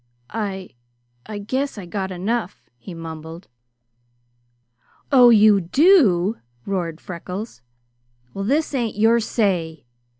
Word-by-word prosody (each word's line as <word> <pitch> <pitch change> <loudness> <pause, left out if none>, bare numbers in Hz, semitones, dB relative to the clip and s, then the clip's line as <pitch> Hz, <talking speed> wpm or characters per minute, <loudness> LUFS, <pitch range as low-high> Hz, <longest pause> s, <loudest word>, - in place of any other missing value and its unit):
"I 195 -4 -4 0.6
I 215 - -6
guess 260 +6 -3
I 200 - -7
got 190 +2 -4
enough," 195 +2 -3
he 175 +8 -10
mumbled. 165 +1 -9 1.6
"Oh, 250 -3 +7
you 210 -3 +6
do?" 220 - +4 0.3
roared 175 -5 -3
Freckles. 180 - -7 0.7
"Well 195 - -4
this 290 +9 0
ain't 235 -5 -2
your 225 +2 +4
say. 175 - -1
200 Hz, 105 wpm, -21 LUFS, 175-230 Hz, 1.6 s, Oh